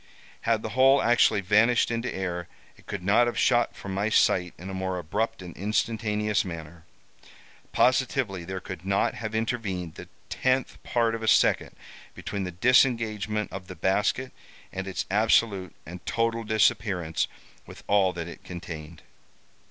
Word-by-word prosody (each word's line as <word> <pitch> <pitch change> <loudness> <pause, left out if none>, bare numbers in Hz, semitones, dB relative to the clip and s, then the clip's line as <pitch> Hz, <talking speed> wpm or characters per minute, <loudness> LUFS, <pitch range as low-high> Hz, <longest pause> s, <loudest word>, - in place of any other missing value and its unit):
Had 115 -2 +2
the 110 - -3
whole 130 +5 +5
actually 120 -4 +3
vanished 110 +6 +3
into 115 +2 -2
air, 90 -2 -4 0.3
it - - -22
could 100 -2 -5
not 105 +6 +4
have 120 - -3
shot 120 -1 +2
from 95 - -7
my 100 +3 0
sight 90 -4 +2
in 90 - -9
a 95 - -5
more 95 -1 -2
abrupt 105 +5 -2
and 90 -2 -9
instantaneous 105 +1 0
manner. 80 -2 -8 0.9
Positively, 125 -7 +1
there 95 +2 -5
could 90 -1 -8
not 100 +1 +1
have 110 -1 -5
intervened 105 -7 -2
the 90 - -10 0.2
tenth 130 0 -1
part 115 -2 +1
of 115 - -4
a 110 - -3
second - - +3 0.4
between 100 -2 -4
the 90 - -4
disengagement 110 -1 +2
of 95 -1 -7
the 90 - -8
basket 105 +9 0 0.4
and 95 0 -4
its 95 +2 -3
absolute 105 -3 +2
and 90 +2 -9
total 115 0 0
disappearance 100 -6 +1 0.4
with - - -12
all 100 -2 +3
that 85 -2 -6
it 85 +3 -10
contained. 85 -3 -8
100 Hz, 155 wpm, -26 LUFS, 90-115 Hz, 0.9 s, whole